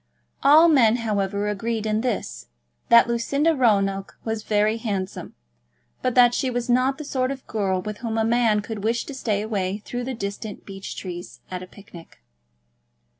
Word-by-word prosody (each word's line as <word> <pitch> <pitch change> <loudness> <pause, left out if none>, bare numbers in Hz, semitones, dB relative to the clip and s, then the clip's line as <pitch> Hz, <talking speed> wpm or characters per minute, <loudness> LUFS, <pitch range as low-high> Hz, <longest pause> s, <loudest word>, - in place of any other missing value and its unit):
All 305 +4 +7
men, 245 -8 +5
however, 205 -3 -1
agreed 220 +2 -2
in 215 0 0
this, 245 -4 -3 0.4
that 235 0 +7
Lucinda 280 +7 +1
Roanoke 195 -6 +1
was 220 -1 -2
very 210 +1 +1
handsome, 200 -5 -4 0.7
but 255 - -1
that 245 -1 +6
she 260 - 0
was 245 0 -2
not 255 +2 +2
the 310 - -6
sort 260 -2 -1
of 270 -1 -6
girl 190 -4 -1
with 210 0 -6
whom 225 -1 -3
a 220 - +2
man 225 -2 +2
would 220 -3 -5
wish 230 +2 0
to 285 - -7
stray 215 -6 -1
away 200 -3 -2
through 245 0 -4
the 260 0 -4
distant 200 0 -6
beech 195 -1 -7
trees 175 -1 -8
at 180 -1 -4
a 185 - -9
picnic. 170 - -15
220 Hz, 175 wpm, -23 LUFS, 200-245 Hz, 0.7 s, All